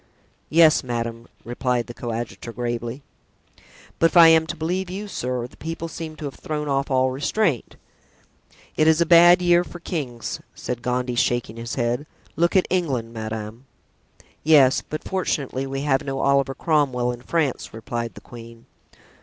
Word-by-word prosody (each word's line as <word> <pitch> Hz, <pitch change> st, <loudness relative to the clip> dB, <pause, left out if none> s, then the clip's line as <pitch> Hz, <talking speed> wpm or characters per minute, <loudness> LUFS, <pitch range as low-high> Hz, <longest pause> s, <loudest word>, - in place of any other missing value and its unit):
"Yes, 160 Hz, -1 st, +5 dB
madame," 115 Hz, -1 st, -4 dB, 0.2 s
replied 120 Hz, 0 st, -1 dB
the 120 Hz, -, -9 dB
coadjutor, 115 Hz, -2 st, -5 dB
gravely. 120 Hz, +2 st, -4 dB, 1.0 s
"But 165 Hz, -, +6 dB
if -, -, 0 dB
I 165 Hz, -1 st, +10 dB
am 160 Hz, 0 st, +4 dB
to 170 Hz, -, -4 dB
believe 180 Hz, +3 st, -2 dB
you, 200 Hz, +3 st, -5 dB
sir, 125 Hz, -9 st, -3 dB
the 125 Hz, -, -14 dB
people 165 Hz, +1 st, -5 dB
seem 160 Hz, -1 st, -7 dB
to 155 Hz, -, -7 dB
have 140 Hz, -, -5 dB
thrown 150 Hz, -1 st, -4 dB
off 140 Hz, 0 st, 0 dB
all 130 Hz, -1 st, +2 dB
restraint." 145 Hz, -, -1 dB, 1.0 s
"It 155 Hz, -, +3 dB
is 160 Hz, 0 st, +5 dB
a 170 Hz, -, +4 dB
bad 175 Hz, +2 st, +7 dB
year 175 Hz, 0 st, +4 dB
for 175 Hz, -, -10 dB
kings," 135 Hz, -10 st, -4 dB, 0.2 s
said 125 Hz, -1 st, -5 dB
Gondy, 125 Hz, 0 st, -1 dB
shaking 120 Hz, -2 st, 0 dB
his 115 Hz, 0 st, -5 dB
head; 120 Hz, +4 st, -1 dB, 0.3 s
"look 170 Hz, +3 st, +1 dB
at 185 Hz, -, +4 dB
England, 135 Hz, -11 st, -1 dB
madame." 110 Hz, +2 st, -6 dB, 0.8 s
"Yes; 145 Hz, -4 st, +5 dB
but 155 Hz, -, -7 dB
fortunately 140 Hz, -8 st, -2 dB
we 135 Hz, 0 st, -4 dB
have 140 Hz, 0 st, +1 dB
no 135 Hz, -1 st, -4 dB
Oliver 140 Hz, -1 st, +2 dB
Cromwell 135 Hz, -7 st, +1 dB
in 120 Hz, 0 st, -8 dB
France," 150 Hz, -1 st, -1 dB
replied 115 Hz, +1 st, -5 dB
the -, -, -11 dB
queen. 115 Hz, -1 st, -12 dB
135 Hz, 160 wpm, -23 LUFS, 120-160 Hz, 1.0 s, I